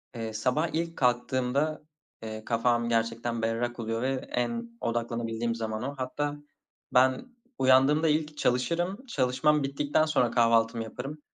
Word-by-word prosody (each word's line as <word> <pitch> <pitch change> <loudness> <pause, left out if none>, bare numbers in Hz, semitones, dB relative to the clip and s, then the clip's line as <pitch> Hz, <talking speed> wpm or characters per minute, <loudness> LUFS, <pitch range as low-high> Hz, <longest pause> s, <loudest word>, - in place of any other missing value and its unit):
Eee, 110 -1 -4
sabah 125 +9 +1
ilk 165 +1 -2
kalktığımda, 130 +4 +1 0.4
eee, 110 0 -6
kafam 120 0 +1
gerçekten 115 0 -1
berrak 115 +2 -1
oluyor 115 0 -2
ve 135 +1 0 0.2
en 235 - -2
odaklanabildiğim 115 0 -2
zaman 110 0 -3
o. 140 +2 -4
Hatta 145 +3 -2 0.6
ben 130 - +4 0.3
uyandığımda 135 +5 +5
ilk 150 0 0
çalışırım, 175 - 0
çalışmam 140 - +2
bittikten 145 +3 +1
sonra 125 -7 +2
kahvaltımı 115 -1 +3
yaparım. 145 +6 -7
125 Hz, 125 wpm, -28 LUFS, 115-150 Hz, 0.6 s, uyandığımda